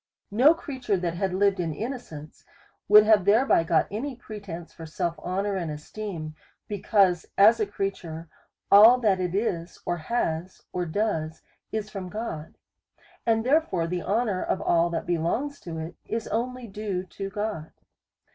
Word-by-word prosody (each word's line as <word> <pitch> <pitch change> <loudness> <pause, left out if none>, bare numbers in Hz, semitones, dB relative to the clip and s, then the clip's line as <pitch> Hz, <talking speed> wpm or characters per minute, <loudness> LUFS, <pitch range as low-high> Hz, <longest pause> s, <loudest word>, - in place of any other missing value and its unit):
No 265 +10 +6
creature 255 -10 -2
that 175 -2 -2
had 190 +2 -1
lived 195 +1 +2
in 165 -3 -2
innocence, 210 - -7 0.4
would 210 +1 +9
have 215 -2 +5
thereby 215 -1 +4
got 165 -1 +2
any 255 +6 -4
pretence 200 -8 -9
for 165 -1 -9
self 170 +2 -2
honour 195 +3 -2
and 175 -4 -2
esteem; 155 +1 -6 0.3
because, 200 -4 +2
as 215 +4 +7
a 215 - +1
creature, 175 -5 -4 0.4
all 220 +5 +9
that 210 -6 +2
it 180 0 -2
is, 175 -5 -2
or 175 - -1
has, 170 -1 -3
or 180 -1 -2
does, 160 -4 -2 0.3
is 215 -1 -3
from 190 -3 -6
God, 180 -7 -6 0.7
and 225 0 +2
therefore 265 - +2
the 175 +1 -2
honour 210 -2 0
of - - -1
all 170 0 +2
that 165 -1 -3
belongs 175 - -1
to 165 -2 -7
it, 160 +2 -5
is 225 0 -3
only 250 +3 -2
due 200 -3 -4
to 195 +1 -7
God. 205 -6 -4
195 Hz, 155 wpm, -26 LUFS, 170-220 Hz, 0.7 s, would